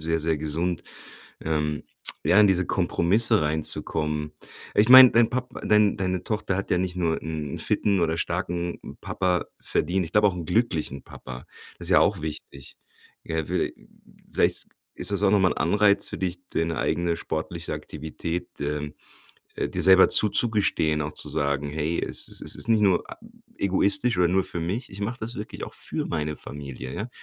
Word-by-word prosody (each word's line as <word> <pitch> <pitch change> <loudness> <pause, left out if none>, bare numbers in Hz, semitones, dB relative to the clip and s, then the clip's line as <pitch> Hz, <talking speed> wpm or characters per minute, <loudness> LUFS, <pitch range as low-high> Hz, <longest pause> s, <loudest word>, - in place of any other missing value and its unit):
sehr, 80 +1 0
sehr 80 0 0
gesund. 80 +4 -2 0.6
Ähm, 75 -2 -2 0.4
ja, 95 - +4
in 105 - +7
diese 90 -2 +2
Kompromisse 100 +5 +2
reinzukommen 75 0 -2 0.4
ich 105 +2 +4
meine, 130 0 +10
dein 115 -1 +4
Pap 125 0 -3 0.2
dein 105 -1 +3
deine 95 -2 -2
Tochter 105 -3 -2
hat 100 - -4
ja - - +3
nicht 90 0 -2
nur 85 -3 0
'n 75 -2 -5
fitten 100 -3 +2
oder 80 -1 +1
starken 85 0 -3 0.2
Papa 90 -1 -1
verdient. 90 +3 0
Ich 80 - -10
glaube 105 0 +5
auch 95 - -1
'n 85 -2 -6
glücklichen 85 - -1
Papa. 65 -1 -10 0.3
Das 85 0 -2
ja 90 - +6
auch 100 -5 +2
wichtig. 75 -3 -8 0.5
Ja, 80 -1 -2
viellei - - -1 0.6
vielleicht - - 0 0.3
ist - - -1
das 100 -1 -1
auch 100 -1 +3
noch 105 - +4
mal 90 - +3
'n - - -5
Anreiz 100 +4 +2
für - - -6
dich, 90 -1 -3
deine 80 0 -1
eigene 85 -1 0
sportliche 85 +1 -4
Aktivität, 80 +3 -5
ähm, 75 0 -3 0.6
äh, - - -1
dir 90 - -2
selber 95 +2 +8
zuzugestehen, 105 -8 +3
auch 75 +1 -4
zu - - -3
sagen: 70 0 -1
„Hey, 80 +2 -2
es - - -3
es - - -6
es - - -3
ist 115 - -7
nicht 110 -2 +4
nur 95 -3 +3
a - - -8 0.4
egoistisch 100 +5 +1
oder 90 -1 +3
nur 95 +2 +2
für 85 - -3
mich. 100 +10 -3
Ich 95 - -10
mache 115 +5 -3
das 115 +2 -4
wirklich 105 -2 -6
auch - - -11
für - - -3
meine 75 -2 -3
Familie. 70 -3 -8
Ja, 110 - -4
90 Hz, 180 wpm, -25 LUFS, 80-100 Hz, 0.6 s, meine